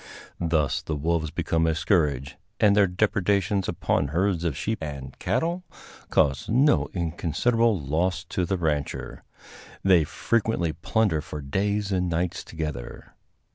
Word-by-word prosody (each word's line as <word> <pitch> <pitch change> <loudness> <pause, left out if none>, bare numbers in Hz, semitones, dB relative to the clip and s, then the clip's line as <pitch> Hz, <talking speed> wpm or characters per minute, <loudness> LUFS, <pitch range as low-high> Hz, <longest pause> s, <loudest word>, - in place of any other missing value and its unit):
Thus 80 -6 +1
the 80 - -3
wolves 80 +1 0
become 80 +2 0
a 80 - +1
scourge, 75 - +1 0.2
and 105 -2 +5
their 100 -2 +5
depredations 100 0 +1
upon 70 - 0
herds 85 +3 0
of 80 -5 -1
sheep 110 -3 -2
and 70 -4 -6
cattle 170 +2 -1 0.5
cause 70 -3 +2
no 135 +6 +3
inconsiderable 95 - +1
loss 85 +6 -1
to 90 - -1
the 95 +2 0
rancher. 75 -4 -2 0.6
They 90 -4 +5
frequently 105 -1 0
plunder 85 0 +1
for 75 0 -7
days 100 +8 -1
and 90 -2 +1
nights 85 +3 -1
together. 75 -7 -6
85 Hz, 135 wpm, -26 LUFS, 75-100 Hz, 0.6 s, and